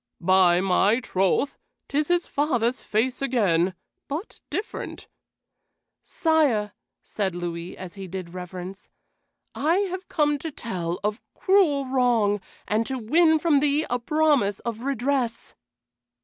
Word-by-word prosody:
"By 180 Hz, 0 st, +4 dB
my 195 Hz, +4 st, +3 dB
troth, 195 Hz, +5 st, 0 dB, 0.3 s
'tis 295 Hz, +1 st, 0 dB
his 350 Hz, 0 st, +2 dB
father's 255 Hz, -4 st, 0 dB
face 245 Hz, +5 st, -1 dB
again, 190 Hz, -9 st, +2 dB, 0.3 s
but 315 Hz, +9 st, -6 dB
different." 420 Hz, -, -5 dB, 0.9 s
"Sire," 290 Hz, -, +1 dB, 0.3 s
said 195 Hz, -4 st, -2 dB
Louis, 175 Hz, 0 st, -5 dB
as 185 Hz, -2 st, -8 dB
he 195 Hz, -2 st, -8 dB
did 180 Hz, -1 st, -7 dB
reverence, 185 Hz, +1 st, -8 dB, 0.6 s
"I 315 Hz, +5 st, +1 dB, 0.2 s
have 370 Hz, 0 st, -6 dB
come 295 Hz, -1 st, +1 dB
to 320 Hz, -, -4 dB
tell 180 Hz, -, -4 dB
of 210 Hz, +2 st, -1 dB
cruel 350 Hz, -8 st, +3 dB
wrong, 240 Hz, -6 st, +2 dB, 0.3 s
and 215 Hz, +2 st, +1 dB
to 265 Hz, -, -2 dB
win 315 Hz, +8 st, +4 dB
from 310 Hz, -2 st, +3 dB
thee 295 Hz, +2 st, +1 dB
a 245 Hz, -, +1 dB
promise 285 Hz, -7 st, +2 dB
of 230 Hz, -2 st, -4 dB
redress." 260 Hz, -1 st, -1 dB
235 Hz, 125 wpm, -25 LUFS, 190-290 Hz, 0.9 s, By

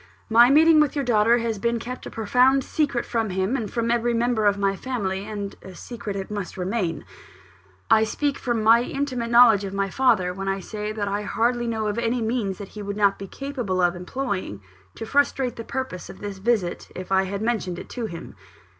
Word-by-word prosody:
My 235 Hz, +2 st, +7 dB
meeting 315 Hz, +3 st, +6 dB
with 300 Hz, -1 st, +2 dB
your 280 Hz, -2 st, -1 dB
daughter 230 Hz, 0 st, +4 dB
has 230 Hz, -3 st, -2 dB
been 235 Hz, +2 st, 0 dB
kept 250 Hz, +2 st, -7 dB
a -, -, -6 dB
profound 250 Hz, +5 st, +3 dB
secret 280 Hz, -5 st, -1 dB
from 225 Hz, -3 st, -1 dB
him, 190 Hz, +6 st, -1 dB
and 225 Hz, -6 st, -3 dB
from 235 Hz, -1 st, -1 dB
every 235 Hz, 0 st, +1 dB
member 230 Hz, -2 st, +1 dB
of 200 Hz, 0 st, +3 dB
my 195 Hz, -1 st, +1 dB
family; 200 Hz, -5 st, -3 dB
and 205 Hz, -2 st, -5 dB
a 190 Hz, -1 st, -11 dB
secret 210 Hz, -3 st, -6 dB
it 195 Hz, +1 st, -5 dB
must 205 Hz, -3 st, -5 dB
remain. 185 Hz, -3 st, -2 dB, 0.8 s
I 220 Hz, -, +5 dB
speak 280 Hz, +6 st, -1 dB
from 235 Hz, -3 st, -1 dB
my 230 Hz, +2 st, +6 dB
intimate 255 Hz, -2 st, -3 dB
knowledge 235 Hz, -4 st, +6 dB
of 195 Hz, 0 st, -5 dB
my 195 Hz, -1 st, -1 dB
father, 220 Hz, -9 st, +2 dB
when 195 Hz, +1 st, -5 dB
I 195 Hz, 0 st, 0 dB
say 210 Hz, +2 st, -5 dB
that 210 Hz, -2 st, -3 dB
I 200 Hz, +1 st, -1 dB
hardly 240 Hz, +3 st, 0 dB
know 220 Hz, -2 st, -2 dB
of 210 Hz, +2 st, -1 dB
any 235 Hz, +1 st, 0 dB
means 220 Hz, -4 st, -1 dB
that 200 Hz, -, -8 dB
he 210 Hz, -, -9 dB
would 200 Hz, 0 st, -5 dB
not 200 Hz, -1 st, +2 dB
be 195 Hz, -, -6 dB
capable 245 Hz, -8 st, -3 dB
of 175 Hz, 0 st, +2 dB
employing 180 Hz, -, -4 dB, 0.3 s
to 225 Hz, -, -6 dB
frustrate 270 Hz, -1 st, +1 dB
the 230 Hz, -, -6 dB
purpose 260 Hz, -8 st, -5 dB
of -, -, -10 dB
this 200 Hz, -2 st, -6 dB
visit, 200 Hz, -4 st, 0 dB
if 185 Hz, +1 st, -7 dB
I 190 Hz, 0 st, +3 dB
had 200 Hz, +2 st, -4 dB
mentioned 220 Hz, -7 st, -1 dB
it -, -, -9 dB
to 240 Hz, -3 st, -4 dB
him. 170 Hz, -4 st, -9 dB
220 Hz, 215 wpm, -24 LUFS, 195-240 Hz, 0.8 s, My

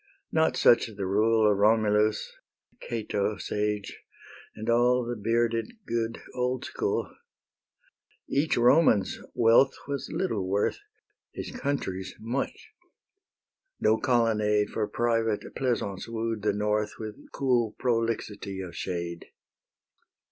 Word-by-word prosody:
Not 160 Hz, 0 st, +2 dB
such 120 Hz, -, +5 dB
the 105 Hz, -3 st, -5 dB
rule 110 Hz, +3 st, +3 dB
Of 100 Hz, -, 0 dB
Romulus, 105 Hz, 0 st, +2 dB, 0.4 s
and -, -, -35 dB
Cato 105 Hz, -3 st, -2 dB
sage, 105 Hz, 0 st, -3 dB, 0.5 s
And 110 Hz, 0 st, -7 dB
all 120 Hz, +1 st, +3 dB
the 120 Hz, +1 st, -3 dB
bearded, 115 Hz, -, 0 dB
good 115 Hz, 0 st, -2 dB
old 125 Hz, 0 st, -1 dB
school. -, -, -2 dB, 1.1 s
Each 145 Hz, +3 st, +1 dB
Roman's 120 Hz, -, +4 dB, 0.2 s
wealth 120 Hz, +4 st, +5 dB
was 140 Hz, -1 st, -3 dB
little 110 Hz, -, -1 dB
worth, 100 Hz, -, 0 dB, 0.5 s
His -, -, -6 dB
country's 140 Hz, -, -3 dB
much; 120 Hz, +5 st, -4 dB, 1.1 s
no 110 Hz, +1 st, +3 dB
colonnade 110 Hz, -5 st, +2 dB
For 105 Hz, -2 st, -1 dB
private 115 Hz, -2 st, 0 dB
pleasance 115 Hz, -7 st, -2 dB
wooed 115 Hz, -1 st, -3 dB
the 105 Hz, 0 st, +2 dB
North 105 Hz, +1 st, 0 dB
With 110 Hz, -1 st, -9 dB
cool 120 Hz, -5 st, +1 dB
"prolixity 115 Hz, -5 st, -1 dB
of 90 Hz, -3 st, -7 dB
shade." 85 Hz, -2 st, -4 dB
110 Hz, 110 wpm, -27 LUFS, 105-120 Hz, 1.1 s, such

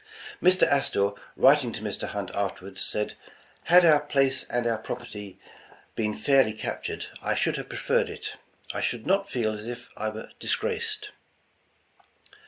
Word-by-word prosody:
Mr. 185 Hz, +1 st, +5 dB
Astor, 100 Hz, -8 st, +3 dB, 0.2 s
writing 135 Hz, -2 st, +5 dB
to -, -, -6 dB
Mr. 105 Hz, -2 st, -3 dB
Hunt 100 Hz, -3 st, -4 dB
afterward, 100 Hz, -1 st, -3 dB
said, 105 Hz, 0 st, -1 dB, 0.5 s
"Had 175 Hz, +1 st, +7 dB
our 155 Hz, -3 st, +7 dB
place 135 Hz, -3 st, +1 dB
and 120 Hz, 0 st, -1 dB
our 115 Hz, -2 st, +1 dB
property 105 Hz, -5 st, -7 dB, 0.6 s
been 105 Hz, -1 st, -1 dB
fairly 135 Hz, -6 st, +4 dB
captured, 110 Hz, -, -4 dB, 0.2 s
I -, -, 0 dB
should -, -, +1 dB
have -, -, -6 dB
preferred -, -, +1 dB
it. -, -, -6 dB, 0.4 s
I -, -, -2 dB
should 115 Hz, -, -1 dB
not 195 Hz, +1 st, +2 dB
feel 110 Hz, -3 st, 0 dB
as 105 Hz, 0 st, -7 dB
if 120 Hz, 0 st, -7 dB
I 110 Hz, -, -2 dB
were 110 Hz, +1 st, -8 dB
disgraced." 440 Hz, -2 st, -2 dB
120 Hz, 150 wpm, -27 LUFS, 105-150 Hz, 0.6 s, Had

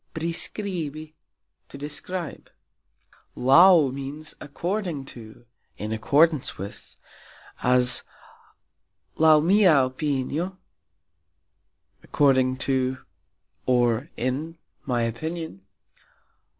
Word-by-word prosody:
"Priskribi", 160 Hz, -2 st, -3 dB, 0.6 s
to -, -, -10 dB
describe. 150 Hz, +4 st, -6 dB, 0.9 s
"Laux" 145 Hz, +2 st, +6 dB
means 140 Hz, +3 st, -7 dB
"according 170 Hz, -1 st, -4 dB
to, 115 Hz, -2 st, -12 dB, 0.3 s
in 105 Hz, +1 st, -5 dB
accordance 145 Hz, +6 st, +2 dB
with", 100 Hz, +2 st, -9 dB, 0.6 s
as 125 Hz, 0 st, +4 dB, 1.2 s
"Laux 155 Hz, -1 st, +5 dB
mia 195 Hz, 0 st, +5 dB, 0.2 s
opinio", 145 Hz, +6 st, -3 dB, 1.4 s
According 130 Hz, -2 st, +2 dB
to 130 Hz, -1 st, -1 dB, 0.7 s
(or, 120 Hz, +2 st, +2 dB
in) 145 Hz, +7 st, -3 dB, 0.3 s
my 120 Hz, -3 st, 0 dB
opinion. 155 Hz, -, -5 dB
145 Hz, 70 wpm, -24 LUFS, 130-165 Hz, 1.4 s, Laux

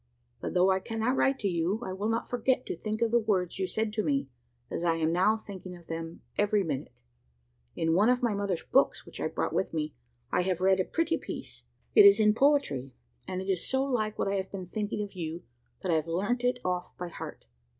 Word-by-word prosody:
But -, -, -4 dB
though 180 Hz, +1 st, +5 dB
I 190 Hz, -, +2 dB
cannot 225 Hz, +5 st, -1 dB
write 270 Hz, 0 st, +3 dB
to 205 Hz, -, +1 dB
you, 175 Hz, +3 st, 0 dB
I 185 Hz, -, -4 dB
will 205 Hz, +3 st, -2 dB
not 230 Hz, +1 st, -1 dB
forget 250 Hz, +1 st, +1 dB
to -, -, -3 dB
think 215 Hz, +6 st, -2 dB
of 230 Hz, -, +1 dB
the 235 Hz, -, +5 dB
words 195 Hz, -6 st, 0 dB
you 190 Hz, -, 0 dB
said 220 Hz, +1 st, -1 dB
to 215 Hz, -1 st, 0 dB
me, 280 Hz, -, 0 dB, 0.4 s
as -, -, -2 dB
I 165 Hz, -1 st, +3 dB
am 160 Hz, 0 st, +1 dB
now 200 Hz, +5 st, +3 dB
thinking 190 Hz, -4 st, -9 dB
of 170 Hz, -, -17 dB
them 165 Hz, 0 st, -6 dB, 0.2 s
every 205 Hz, 0 st, +3 dB
minute. 140 Hz, -, -5 dB, 0.7 s
In 165 Hz, 0 st, +1 dB
one 205 Hz, +7 st, +4 dB
of 250 Hz, 0 st, +2 dB
my 235 Hz, -3 st, +2 dB
mother's 200 Hz, -4 st, -1 dB
books 270 Hz, -, +2 dB
which -, -, -8 dB
I -, -, +1 dB
brought -, -, -2 dB
with 190 Hz, -, -1 dB
me, 155 Hz, -1 st, -2 dB, 0.4 s
I -, -, +3 dB
have 180 Hz, -1 st, 0 dB
read 190 Hz, +1 st, +4 dB
a 185 Hz, -, +2 dB
pretty 330 Hz, 0 st, 0 dB
piece. -, -, -7 dB, 0.3 s
It 420 Hz, -, +9 dB
is 400 Hz, 0 st, +8 dB
in 210 Hz, -1 st, +5 dB
poetry; 220 Hz, -, +2 dB, 0.3 s
and 185 Hz, 0 st, -3 dB
it -, -, -9 dB
is 190 Hz, -3 st, 0 dB
so 265 Hz, 0 st, +2 dB
like 220 Hz, -6 st, -1 dB
what -, -, 0 dB
I 200 Hz, 0 st, +1 dB
have 190 Hz, 0 st, -4 dB
been 190 Hz, -2 st, -5 dB
thinking 210 Hz, +2 st, -2 dB
of 205 Hz, -, -8 dB
you, 170 Hz, -2 st, -5 dB, 0.4 s
that 185 Hz, -, 0 dB
I -, -, +4 dB
have 155 Hz, +1 st, -2 dB
learnt 205 Hz, +9 st, 0 dB
it 245 Hz, 0 st, +2 dB
off 180 Hz, -1 st, -2 dB
by 180 Hz, -1 st, -5 dB
heart. -, -, -8 dB
195 Hz, 235 wpm, -29 LUFS, 180-225 Hz, 0.7 s, It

